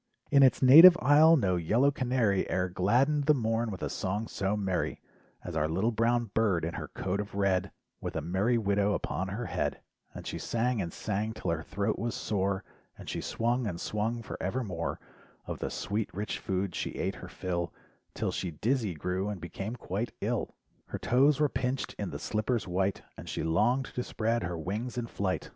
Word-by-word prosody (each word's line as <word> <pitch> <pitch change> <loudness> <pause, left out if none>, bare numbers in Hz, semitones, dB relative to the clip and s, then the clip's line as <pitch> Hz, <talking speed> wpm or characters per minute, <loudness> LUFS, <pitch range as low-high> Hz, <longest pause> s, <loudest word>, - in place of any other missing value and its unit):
In 140 -1 +6
its 130 0 +5
native 165 +7 +10
isle 155 +5 +6
no 95 -8 +1
yellow 115 - +3
canary 125 -7 +1
E'er 90 0 0
gladdened 125 +11 +2
the 150 0 +5
morn 115 -1 0
with 95 -4 -6
a - - 0
song 105 +4 -2
so 100 +2 -1
merry. 95 -3 -1 0.4
As 90 - -6
our 75 -1 +1
little 95 +8 +1
brown 115 0 +1
bird 100 -8 +2
in 85 - -3
her - - -5
coat 95 +2 -3
of 105 -1 -5
red 100 -1 +1 0.3
With - - -5
a - - -1
"merry 95 - +1
widow" 100 -1 +1
upon 95 - -3
her 105 +6 -4
head, - - -2 0.4
And - - -8
she - - -4
sang 120 -1 0
and 85 -2 -4
sang 105 +4 -2
'till 95 - -3
her 80 -1 -1
thoat 100 +5 -2
was 120 0 -2
sore 100 -1 -1 0.3
And - - -11
she - - -3
swung 120 +1 0
and 85 -4 -4
swung 110 +4 -2
forevermore, 95 - -3 0.5
Of - - -5
the - - -2
sweet 105 +1 -2
rich 105 +2 -3
food 95 -2 -2
she - - -3
ate - - -2
her - - -9
fill 85 -2 -3 0.4
'Till - - -1
she 90 - -3
dizzy 110 - -1
grew 90 +6 -2
and 100 -3 -4
became 95 +6 -5
quite 110 0 -4
ill 115 +2 -2 0.3
Her - - -4
toes 135 +3 +3
were 150 - +4
pinched 130 -1 -2
in - - -2
the - - -5
slippers 110 0 -1
white 95 +2 -1
And - - -9
she - - -3
longed 110 +11 +2
to 125 - -2
spread 115 0 -1
her 85 -2 -3
wings 105 +10 -4
in 120 - -1
flight. 100 -4 -2
105 Hz, 195 wpm, -30 LUFS, 95-120 Hz, 0.5 s, native